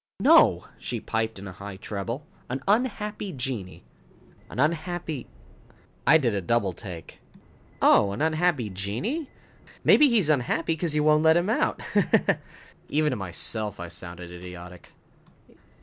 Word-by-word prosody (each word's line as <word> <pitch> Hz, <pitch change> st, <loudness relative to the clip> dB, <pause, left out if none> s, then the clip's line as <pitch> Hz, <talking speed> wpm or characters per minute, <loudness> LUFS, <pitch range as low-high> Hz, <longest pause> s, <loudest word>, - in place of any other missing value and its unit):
"No," -, -, +5 dB
she -, -, -4 dB
piped, 110 Hz, -1 st, -2 dB
in 100 Hz, +1 st, -8 dB
a -, -, -6 dB
high 100 Hz, +2 st, -8 dB
treble. 105 Hz, +7 st, -5 dB, 0.2 s
"An 130 Hz, +2 st, -4 dB
unhappy 210 Hz, -2 st, 0 dB
genii." 125 Hz, -, -5 dB, 0.7 s
"An -, -, -9 dB
unhappy 160 Hz, -1 st, -1 dB, 0.4 s
" -, -, -29 dB
I 160 Hz, -, +8 dB
did 125 Hz, -8 st, 0 dB
a 100 Hz, -, -1 dB
double 100 Hz, -1 st, +1 dB
take. 85 Hz, -3 st, -9 dB, 0.6 s
"Oh, 100 Hz, -, +5 dB
an 100 Hz, -, -5 dB
unhappy 155 Hz, -, +1 dB
genii? 120 Hz, -, -3 dB, 0.5 s
Maybe 295 Hz, -2 st, +6 dB
he's 220 Hz, -9 st, +3 dB
unhappy 155 Hz, +3 st, +1 dB
because 160 Hz, -1 st, -2 dB
you 150 Hz, -, +2 dB
won't 155 Hz, 0 st, +4 dB
let 160 Hz, +1 st, +5 dB
him 180 Hz, +5 st, +1 dB
out, -, -, 0 dB
ha -, -, +2 dB, 0.2 s
ha." -, -, +2 dB, 0.5 s
Even 150 Hz, 0 st, +2 dB
to -, -, -1 dB
myself, 105 Hz, +2 st, -2 dB
I 85 Hz, -1 st, -6 dB
sounded 85 Hz, 0 st, -8 dB
idiotic. 90 Hz, 0 st, -10 dB
125 Hz, 150 wpm, -26 LUFS, 100-160 Hz, 0.7 s, I